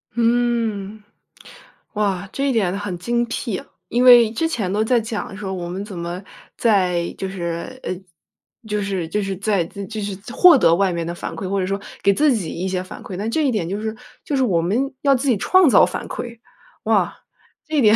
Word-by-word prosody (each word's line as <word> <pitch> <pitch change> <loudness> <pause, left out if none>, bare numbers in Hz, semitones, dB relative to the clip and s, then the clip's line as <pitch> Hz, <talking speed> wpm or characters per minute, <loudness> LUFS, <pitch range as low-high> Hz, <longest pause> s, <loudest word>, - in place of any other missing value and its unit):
嗯。 230 -3 0 0.9
哇， 200 -2 -1
这 275 +1 0
一 - - +1
点 195 -5 +1
很 205 -3 -4
精 240 +4 0
辟。 230 -4 -3 0.3
因 245 +1 +2
为 240 -3 +8
之 325 +9 0
前 210 - -2
都 210 +2 +1
在 240 +2 +3
讲 215 -3 -5
说 195 -2 -4
我 175 -2 -4
们 190 +3 -4
怎 195 -4 -8
么， 170 +2 -4 0.4
在 180 -6 +2
就 190 - -3
是 175 +6 -5
呃， - - -3 0.8
就 210 -1 -1
是 195 -4 -2
就 210 +3 -1
是 195 -1 -3
在 200 -3 +1
就 200 +5 -6
是 200 -2 -4 0.2
获 345 +2 +8
得 165 -9 +5
外 195 +1 +2
面 170 -1 -3
的 170 - -4
反 - - -6
馈， 190 -1 -5
或 200 - 0
者 185 - 0
说 195 +1 -1 0.2
给 200 - +5
自 295 +6 +3
己 195 -9 -2
一 180 +3 -3
些 185 -1 -2
反 185 - -10
馈， 190 - -7
那 205 +3 -3
这 310 +6 +1
一 - - +2
点 205 -8 -1
就 200 +3 -3
是 220 0 -3 0.3
就 290 - -1
是 265 - +2
我 180 -9 +2
们 245 +11 0
要 280 -1 +5
自 265 +2 -2
己 235 - +3
创 370 - +5
造 - - +7
反 - - -5
馈。 235 -1 -6 0.5
哇， - - +2 0.5
这 310 0 -2
一 - - +4
点 215 -2 +6
205 Hz, 230 characters per minute, -21 LUFS, 185-240 Hz, 0.9 s, 为